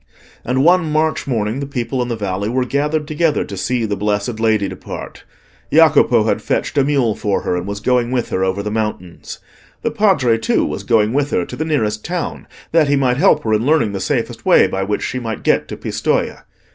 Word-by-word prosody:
And 130 +2 0
one 175 -1 +3
March 155 0 0
morning 115 -1 -1
the 140 - -4
people 130 -1 -3
in 120 - -2
the 120 - -2
valley 100 -1 -3
were 125 +1 0
gathered 150 +3 -1
together 155 0 +1
to 100 - -7
see 120 +4 -1
the 105 -1 -2
blessed 105 +3 -2
Lady 110 -3 +2
depart. - - -8 0.5
Jacopo - - +5
had - - 0
fetched - - -2
a - - +4
mule 135 -6 +1
for 100 -1 -1
her, - - -1
and 90 +1 -4
was 100 0 -4
going 120 +2 +1
with 125 -2 -1
her 95 - -1
over 95 +2 -1
the 105 - -3
mountains. 105 -5 -4 0.5
The 230 - 0
Padre, 190 - +2
too, 110 - +1
was - - -4
going 110 -1 +2
with 145 +1 +1
her 90 - 0
to - - -8
the 155 - -3
nearest 110 -9 -1
town, 175 -1 -4 0.2
that 160 -2 +4
he 145 - +3
might 130 -3 +1
help 155 -2 +3
her 110 - 0
in 110 +1 +1
learning 145 -6 +2
the 100 - -4
safest 95 - -2
way - - +5
by 95 - -2
which 105 +2 -2
she 130 - -3
might 115 -3 -5
get - - +2
to - - -7
Pistoja. - - -2
120 Hz, 220 wpm, -18 LUFS, 105-145 Hz, 0.5 s, Jacopo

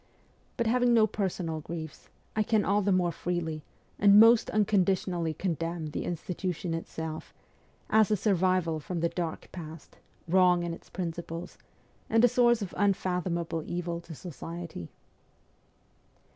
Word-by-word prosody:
But 235 - 0
having 245 +1 +3
no 220 -2 +6
personal 185 -6 -2
griefs, 160 0 -8 0.3
I 215 - +2
can 215 -1 +2
all 205 +2 +2
the 200 0 +1
mare 180 -2 +2
freely, 165 -3 -3 0.4
and 200 0 +7
most 225 +1 +6
unconditionally 185 -5 +1
condemn 165 -2 -3
the - - -3
institution 175 0 -3
itself, 160 -1 -6 0.5
as 220 -1 +4
a 210 - +2
survival 185 -4 +1
from 170 +2 -4
the 170 - +2
dark 170 -2 -4
past, 160 -3 -10 0.3
wrong 180 0 +4
in 170 -1 -3
its - - -12
principles, 170 -1 -5 0.5
and 225 +2 +5
a - - +7
source 240 -2 +3
of 190 - -7
unfathomable 180 -4 0
evil 170 0 -4
to 165 -2 -10
society. 165 - -7
175 Hz, 135 wpm, -29 LUFS, 165-200 Hz, 0.5 s, and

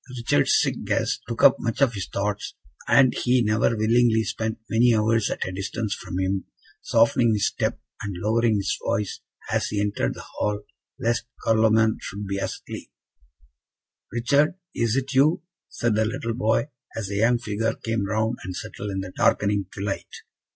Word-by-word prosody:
Richard's 115 -11 +3
sick - - -1
guest - - 0
took - - -3
up - - +8
much 115 - -2
of 135 -4 +3
his 100 -3 -4
thoughts, 100 0 -3 0.3
and 130 -2 +5
he 125 0 +2
never 110 +1 +2
willingly 110 +1 +3
spent 110 0 -3
many 120 +1 +4
hours 110 0 +2
at - - -2
a - - -3
distance 100 +3 -3
from 90 - -6
him, 95 0 -1 0.4
softening 115 0 +3
his 105 - +1
step - - -1 0.2
and 100 -2 -4
lowering 110 +3 +2
his 100 -1 0
voice, 105 -2 -1 0.3
as - - +1
he 105 - -2
entered 100 0 -1
the - - -9
hall, 105 0 0 0.4
lest 115 0 0 0.2
Carloman 110 0 +4
should 100 +2 -6
be 100 0 -2
asleep. - - -6 1.2
"Richard, 140 - +2 0.2
is 115 -1 0
it 135 +1 -1
you?" 145 +6 +3 0.3
said 115 -2 0
the 110 +1 +2
little 115 +1 -2
boy, 110 +4 +1 0.3
as 105 -4 -3
the 100 - -3
young 120 +3 +4
figure 115 0 -2
came 115 -3 -2
round 110 +3 0
the 95 - -5
settle 105 +3 -6
in 95 -1 -2
the 95 -1 -8
darkening 100 -2 +2
twilight. 100 0 -4
110 Hz, 170 wpm, -24 LUFS, 100-115 Hz, 1.2 s, up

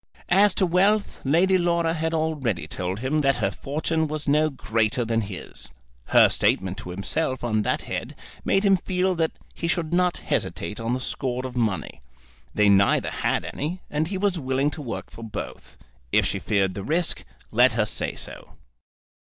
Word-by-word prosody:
As 195 +2 +5
to 190 - +3
wealth, 195 +4 +2
Lady 180 +7 +3
Laura 170 -1 +1
had 160 0 -1
already 145 - -1
told 90 +5 -4
him 140 +4 +1
that 135 -2 +3
her 105 -5 0
fortune 160 - -1
was 150 0 -4
no 150 +2 +3
greater 115 -2 0
than 115 0 +1
his. 100 -3 -7 0.4
Her - - +6
statement 95 +2 +1
to 90 - -8
himself 125 - -2
on 110 -3 +1
that - - -1
head - - -5 0.3
made 195 +2 +2
him 195 -1 +5
feel 185 +1 0
that 165 -2 0 0.2
he 170 - -3
should 165 -1 -1
not 180 0 +2
hesitate 105 - -2
on 115 +2 -1
the - - -3
score 130 0 -2
of 130 -1 -6
money. 110 -6 -1 0.5
They 105 0 +4
neither 100 0 +4
had - - -1
any, 165 +6 -4
and 150 +2 0
he 190 +2 -3
was 190 -2 0
willing 135 +1 0
to 150 - -7
work 125 -5 -6
for - - -11
both. 110 - -7 0.3
If - - +4
she - - -1
feared 95 -3 +1
the 100 - -5
risk, 165 - 0 0.3
let - - +5
her - - +2
say - - -3
so. - - -8
145 Hz, 180 wpm, -25 LUFS, 115-170 Hz, 0.5 s, Her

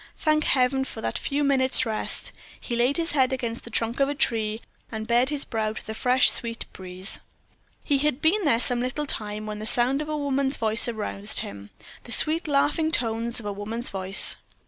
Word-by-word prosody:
thank 310 -1 +1
Heaven 265 0 +2
for 250 - -8
that - - -2
few 285 +1 -2
minutes' 265 -2 +2
rest. 220 -1 -3 0.3
He 240 - -4
laid 245 +5 +1
his 335 0 0
head 265 -3 +2
against 240 -3 -4
the - - -9
trunk 230 +2 -2
of 275 0 +2
a 290 - -3
tree, 220 -6 0 0.3
and 220 -1 -5
bared 240 +3 +2
his 295 -2 -3
brow 220 -2 -2
to - - -9
the 220 - -6
fresh 250 +3 +3
sweet 230 -1 -3
breeze. 185 +1 -5 0.6
He 285 -3 +1
had 295 -2 0
been 365 +7 +2
there 230 -8 +2
some 245 0 +2
little 255 +4 -3
time 210 -5 -3
when 210 0 -6
the 215 - -6
sound 250 +5 +2
of 305 - -6
a 305 - -2
woman's 275 -1 0
voice 220 +1 +4
aroused 215 -2 -2
him 100 0 -9 0.4
the 240 - -10
sweet 315 +6 +3
laughing 300 +3 +1
tones 230 -3 0
of 220 - -10
a 205 - -3
woman's 220 +4 -4
voice. 190 0 +6
245 Hz, 205 wpm, -25 LUFS, 220-280 Hz, 0.6 s, voice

